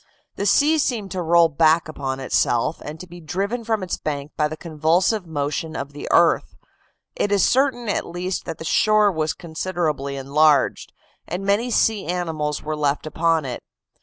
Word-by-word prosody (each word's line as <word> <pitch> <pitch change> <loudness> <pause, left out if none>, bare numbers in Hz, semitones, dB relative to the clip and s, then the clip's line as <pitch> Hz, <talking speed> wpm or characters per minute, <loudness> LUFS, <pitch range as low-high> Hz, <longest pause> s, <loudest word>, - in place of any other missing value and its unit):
The 200 - -2
sea 310 +6 +4
seemed 220 -9 -1
to 185 - -3
roll 170 0 +5
back 160 +1 +3
upon 135 -4 -4
itself, 130 +2 0
and 155 +2 -7
to 185 - -8
be 175 0 -12
driven 200 +9 -3
from 220 -3 -1
its 185 - -3
banks 145 -1 -5
by 150 - +1
the 155 +1 -7
convulsive 170 +5 0
motion 155 +1 -3
of 140 -1 -5
the 145 - -7
earth; 170 0 +3 0.6
it 205 - -1
is 200 -2 +4
certain 255 -3 +1
at 205 - -1
least 180 +2 -4
that 165 -2 -5
the 160 - -8
shore 215 +4 +3
was 155 -3 -1
considerably 160 -5 -3
enlarged, 140 +1 +2 0.4
and 180 +4 -4
many 205 +5 +1
sea 220 -5 +1
animals 160 -4 -2
were 155 0 -3
left 145 -1 -1
upon 160 0 +1
it. 125 -2 -5
165 Hz, 175 wpm, -22 LUFS, 150-195 Hz, 0.6 s, roll